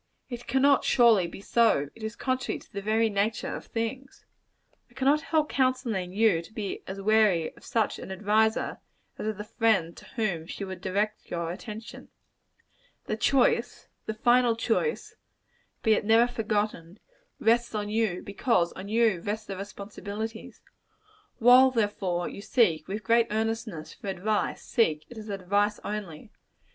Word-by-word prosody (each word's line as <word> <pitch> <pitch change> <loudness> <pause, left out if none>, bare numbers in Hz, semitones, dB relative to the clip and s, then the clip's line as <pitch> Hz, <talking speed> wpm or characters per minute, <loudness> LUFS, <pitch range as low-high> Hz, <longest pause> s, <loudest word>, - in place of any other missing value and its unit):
It 240 0 -7
cannot, 270 +2 +4
surely, 230 -8 +5
be 170 - -10
so; 210 -11 +2
it 225 - -16
is 220 +1 -4
contrary 255 -1 -2
to - - -18
the 200 - -4
very 220 +2 +2
nature 210 +1 -1
of - - -9
things. 255 +4 -5 0.6
I - - -25
cannot 280 +3 +3
help 310 -1 +1
counselling 240 -8 0
you 200 -4 +3
to 170 - -15
be 210 -3 -5
as 190 +1 -6
wary 205 -5 +2
of - - -18
such 225 -3 -1
an - - -8
adviser, 215 +3 +1 0.4
as - - -3
of 215 -2 -2
the 210 - -5
friend 210 -6 +1
to - - -12
whom 185 -8 -1
she 200 - -6
would 190 -2 -7
direct 205 +3 -2
your 170 -1 -3
attention. 215 +4 -9 1.0
The - - -2
choice 365 - +1 0.2
the 220 - -3
final 240 0 +3
choice 230 - -1 0.7
be 220 - +5
it - - +1
never 225 +3 +5
forgotten, 210 -6 -2 0.4
rests 235 0 +2
on 210 -1 -2
you: 215 -4 -1
because 200 -4 +1
on 190 +1 -8
you 220 -4 +2
rests 210 +3 -3
the 195 - -5
responsibilities. 205 +2 -7 0.7
While, 250 +3 +7
therefore, 205 -7 -1
you - - -8
seek, 200 -8 +2
with 210 +2 -4
great 230 +3 +3
earnestness, 220 -6 -3
for - - -11
advice, 200 +3 -1
seek 155 -10 +1
it 235 - -8
as 215 0 -9
advice 200 +2 0
only. 205 -2 -6
215 Hz, 155 wpm, -27 LUFS, 195-230 Hz, 1.0 s, While